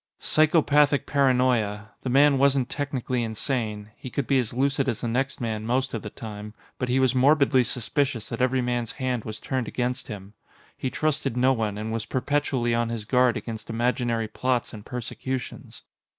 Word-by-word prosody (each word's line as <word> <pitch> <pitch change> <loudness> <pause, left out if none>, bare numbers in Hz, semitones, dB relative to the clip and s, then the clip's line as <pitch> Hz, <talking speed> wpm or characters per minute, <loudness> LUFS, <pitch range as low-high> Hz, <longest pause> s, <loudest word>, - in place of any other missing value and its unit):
Psychopathic 150 -2 +3
paranoia. 125 -7 +1
The 130 - -3
man 140 +1 +5
wasn't 135 -2 +3
technically 130 -3 -2
insane; 110 -2 -2
he 130 - -8
could 140 - -2
be 135 -2 +3
as 120 -3 0
lucid 135 +2 +1
as 115 - -3
the 120 - -2
next 130 +4 -1
man 110 -3 -3
most 130 +3 0
of 115 - -3
the 105 - -6
time. 105 0 -8 0.2
But 125 - -2
he 130 +2 +2
was 130 -1 +3
morbidly 135 0 +4
suspicious 125 0 -1
that 115 0 -4
every 130 0 +2
man's 120 -2 -2
hand 130 -4 -2
was 110 -1 -6
turned 130 -4 -2
against 125 +1 -2
him. 105 -2 -8 0.4
He 130 - -3
trusted 145 -4 -1
no 130 +2 +4
one, 110 -4 -2
and 110 +1 -4
was 115 -1 -3
perpetually 130 -3 0
on 115 0 +1
his 115 -2 -4
guard 125 +1 +3
against 110 -2 -7
imaginary 120 -1 0
plots 125 +3 -1
and 105 -2 -9
persecutions. 125 +2 -6
125 Hz, 180 wpm, -25 LUFS, 115-135 Hz, 0.4 s, man